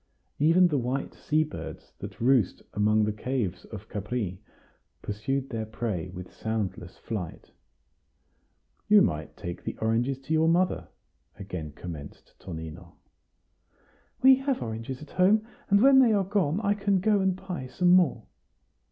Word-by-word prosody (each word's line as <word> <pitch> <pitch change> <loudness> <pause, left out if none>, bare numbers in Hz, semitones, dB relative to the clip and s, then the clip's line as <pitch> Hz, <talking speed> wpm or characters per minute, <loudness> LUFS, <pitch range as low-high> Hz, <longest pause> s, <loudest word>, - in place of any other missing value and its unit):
Even 165 +5 +5
the 145 -4 +1
white 125 +3 -2
sea 155 +1 +1
birds 155 - -8
that - - -8
roost 125 -4 +2
among 105 +1 +3
the 105 - +1
caves 105 -4 -3
of 105 -4 -9
Capri 105 -3 -4 0.6
pursued 135 +6 -2
their 110 -2 -3
prey 105 -6 -3
with 90 0 -9
soundless 100 -5 -4
flight. 95 -8 -6 1.4
"You 210 -1 +7
might 75 -2 -2
take 85 0 -6
the - - -5
oranges 115 +4 0
to 155 +4 -3
your 160 0 +3
mother," 180 +2 +2 0.5
again 90 -7 -6
commenced 80 -4 -9
Tonino. 85 0 -8 1.3
"We 265 0 +8
have 270 -1 -1
oranges 115 +4 -5
at 150 - -14
home; 205 +4 +3 0.2
and 200 0 +5
when 270 +1 +7
they 240 -4 +5
are 200 -2 +3
gone, 190 -4 +1
I 205 -1 +2
can 200 -1 +1
go 205 +2 +3
and 190 -1 +1
buy 180 -8 -6
some 175 +7 +2
more." 180 -5 +4
125 Hz, 145 wpm, -27 LUFS, -, 1.4 s, We